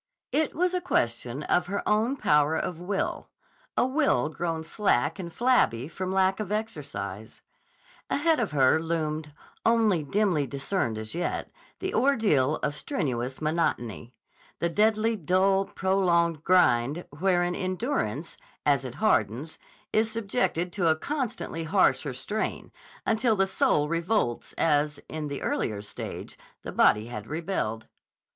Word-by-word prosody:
It 310 Hz, +1 st, +1 dB
was 360 Hz, +2 st, +1 dB
a 365 Hz, -, 0 dB
question 120 Hz, -, -1 dB
of 175 Hz, +2 st, +1 dB
her 200 Hz, +2 st, -3 dB
own 225 Hz, +6 st, +2 dB
power 150 Hz, -, +3 dB
of 170 Hz, -2 st, -3 dB
will, 195 Hz, +3 st, -2 dB, 0.5 s
a -, -, +4 dB
will 260 Hz, -, +2 dB
grown 165 Hz, 0 st, -3 dB
slack 160 Hz, -, +1 dB
and 170 Hz, -2 st, -5 dB
flabby 230 Hz, -, +2 dB
from 185 Hz, +3 st, -4 dB
lack 190 Hz, +1 st, +2 dB
of 210 Hz, -2 st, -4 dB
exercise. 145 Hz, -, -5 dB, 0.7 s
Ahead 320 Hz, +1 st, +2 dB
of 230 Hz, -, 0 dB
her 135 Hz, +1 st, +4 dB
loomed, 155 Hz, -2 st, -2 dB, 0.3 s
only 225 Hz, -7 st, +3 dB
dimly 165 Hz, -2 st, +1 dB
discerned 135 Hz, -, -2 dB
as 110 Hz, 0 st, -6 dB
yet, 175 Hz, +1 st, -2 dB, 0.3 s
the 380 Hz, 0 st, -3 dB
ordeal 205 Hz, -, +3 dB
of 145 Hz, -, 0 dB
strenuous 130 Hz, -, -3 dB
monotony; 125 Hz, -, -1 dB, 0.4 s
the 170 Hz, -, 0 dB
deadly 215 Hz, +4 st, +2 dB
dull, 190 Hz, +2 st, +2 dB
prolonged 170 Hz, -5 st, +1 dB
grind 160 Hz, -4 st, +3 dB
wherein 175 Hz, -1 st, +2 dB
endurance, 185 Hz, -, -2 dB, 0.3 s
as 140 Hz, -2 st, +3 dB
it 125 Hz, -1 st, -6 dB
hardens, 135 Hz, -, 0 dB, 0.3 s
is 220 Hz, +1 st, +3 dB
subjected 200 Hz, -5 st, -1 dB
to 180 Hz, -5 st, +1 dB
a 160 Hz, -, +5 dB
constantly 230 Hz, -, -3 dB
harsher 160 Hz, -6 st, +2 dB
strain, 210 Hz, +11 st, -3 dB, 0.3 s
until 225 Hz, 0 st, +2 dB
the 195 Hz, -1 st, +3 dB
soul 150 Hz, -5 st, +2 dB
revolts 170 Hz, -, -1 dB
as, 150 Hz, -1 st, +1 dB
in 155 Hz, -1 st, -4 dB
the 140 Hz, -1 st, -5 dB
earlier 105 Hz, -2 st, -1 dB
stage, 105 Hz, -, -7 dB, 0.2 s
the -, -, -5 dB
body 105 Hz, +1 st, +4 dB
had 110 Hz, -3 st, -7 dB
rebelled. 155 Hz, -, -2 dB
170 Hz, 135 wpm, -27 LUFS, 145-210 Hz, 0.7 s, a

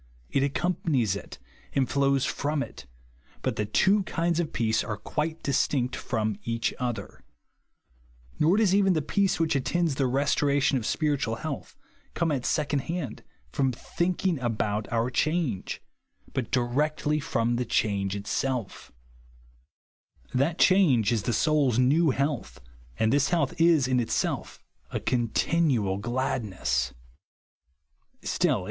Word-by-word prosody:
It 140 Hz, -, +2 dB
accom 175 Hz, +6 st, 0 dB
panics 120 Hz, -, +1 dB
it, 100 Hz, -, -8 dB, 0.4 s
and 135 Hz, -2 st, +2 dB
flows 140 Hz, -1 st, +2 dB
from 145 Hz, 0 st, -1 dB
it, 70 Hz, -, -11 dB, 0.6 s
but -, -, 0 dB
the 105 Hz, -, -2 dB
tv/o 195 Hz, -, +3 dB
kinds 170 Hz, -2 st, -1 dB
of 165 Hz, -3 st, -1 dB
peace 110 Hz, -1 st, +1 dB
are 105 Hz, -2 st, -4 dB
quite 160 Hz, +1 st, -3 dB
distinct 130 Hz, -2 st, +1 dB
from 110 Hz, -4 st, -2 dB
each 115 Hz, 0 st, -1 dB
other. 125 Hz, -3 st, -4 dB, 1.2 s
Nor 165 Hz, +6 st, +4 dB
does 210 Hz, -4 st, +3 dB
even 195 Hz, -1 st, +4 dB
the 155 Hz, -3 st, 0 dB
peace 195 Hz, +3 st, +1 dB
which 160 Hz, -2 st, +1 dB
at 135 Hz, -, +1 dB
tends 170 Hz, -1 st, +1 dB
the 135 Hz, 0 st, +1 dB
restoration 140 Hz, +1 st, +2 dB
of 110 Hz, -, -4 dB
spiritual 145 Hz, -7 st, 0 dB
health 150 Hz, +2 st, -6 dB, 0.4 s
come 170 Hz, -2 st, +1 dB
at 130 Hz, -4 st, -1 dB
second 150 Hz, -1 st, +1 dB
hand, 165 Hz, 0 st, -4 dB, 0.3 s
from 130 Hz, -, +1 dB
thinkinrj 175 Hz, +4 st, -1 dB
about 110 Hz, -3 st, -1 dB
OUT 120 Hz, +2 st, 0 dB
change; 155 Hz, -, -1 dB, 0.5 s
but 125 Hz, -4 st, -2 dB
directly 150 Hz, +5 st, 0 dB
from 120 Hz, -4 st, 0 dB
the 125 Hz, -, 0 dB
change 100 Hz, -4 st, 0 dB
itself 110 Hz, +2 st, -3 dB, 1.4 s
That 150 Hz, +6 st, +1 dB
change 155 Hz, -, +4 dB
is 115 Hz, -3 st, +1 dB
the 120 Hz, -, -1 dB
soul's 145 Hz, -4 st, +2 dB
new 145 Hz, +6 st, +4 dB
health, 140 Hz, -1 st, -2 dB, 0.4 s
and 110 Hz, +2 st, +2 dB
this 140 Hz, 0 st, +3 dB
health 160 Hz, -6 st, +1 dB
is 165 Hz, -6 st, +5 dB
in 130 Hz, -1 st, +2 dB
itself 120 Hz, -, -1 dB, 0.3 s
a -, -, -3 dB
continual 120 Hz, -, +1 dB
glad 125 Hz, +4 st, -1 dB
nesit. 65 Hz, -, -1 dB
135 Hz, 135 wpm, -27 LUFS, 115-155 Hz, 1.4 s, is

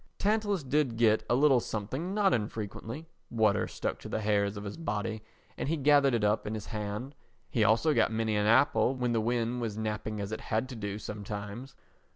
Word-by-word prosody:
Tantalus 205 Hz, -4 st, +1 dB
did 135 Hz, -3 st, 0 dB
get 110 Hz, -2 st, +4 dB
a 120 Hz, -, +4 dB
little 135 Hz, -1 st, +5 dB
something 130 Hz, -, -4 dB
not 200 Hz, -3 st, +3 dB
infrequently; 115 Hz, +6 st, -4 dB, 0.2 s
water 110 Hz, -3 st, +2 dB
stuck -, -, -3 dB
to -, -, -9 dB
the 110 Hz, -, -2 dB
hairs 100 Hz, -1 st, +1 dB
of 100 Hz, -, -6 dB
his 100 Hz, -1 st, -5 dB
body 110 Hz, -8 st, -3 dB, 0.4 s
and -, -, -2 dB
he 165 Hz, -, +1 dB
gathered 140 Hz, -2 st, +4 dB
it 115 Hz, -, 0 dB
up 105 Hz, +1 st, +1 dB
in 110 Hz, -, -2 dB
his 105 Hz, -, -6 dB
hand; 105 Hz, +4 st, -5 dB, 0.4 s
he 115 Hz, -, +2 dB
also 115 Hz, +9 st, +4 dB
got -, -, +3 dB
many 110 Hz, -1 st, 0 dB
an 105 Hz, 0 st, +1 dB
apple 115 Hz, +1 st, +4 dB
when 125 Hz, -2 st, -1 dB
the 115 Hz, -1 st, +1 dB
wind 120 Hz, +1 st, 0 dB
was 110 Hz, -3 st, -3 dB
napping 110 Hz, 0 st, -3 dB
as 100 Hz, +1 st, -4 dB
it 110 Hz, -, -4 dB
had 110 Hz, +3 st, -1 dB
to 130 Hz, -, -7 dB
do 100 Hz, -2 st, -4 dB
sometimes. 105 Hz, +5 st, -6 dB
115 Hz, 200 wpm, -30 LUFS, 105-135 Hz, 0.4 s, little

